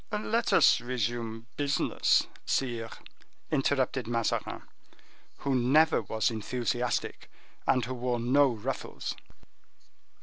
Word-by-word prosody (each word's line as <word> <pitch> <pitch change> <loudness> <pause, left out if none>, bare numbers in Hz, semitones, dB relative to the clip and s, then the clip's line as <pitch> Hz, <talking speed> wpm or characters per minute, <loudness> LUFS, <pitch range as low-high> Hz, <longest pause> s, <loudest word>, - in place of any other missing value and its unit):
"Let 220 +2 0
us - - +5
resume 115 -2 -3
business, 145 0 +2 0.2
sire," 120 -4 -1 0.6
interrupted 135 -4 +1
Mazarin, 115 -1 -1 0.7
who 140 - -1
never 140 +6 +4
was 110 +2 0
enthusiastic, 120 +2 -2 0.4
and 125 -3 +3
who 130 - -4
wore 125 -1 -1
no 135 +4 +4
ruffles. 115 -4 -4
125 Hz, 95 wpm, -29 LUFS, 115-135 Hz, 0.7 s, us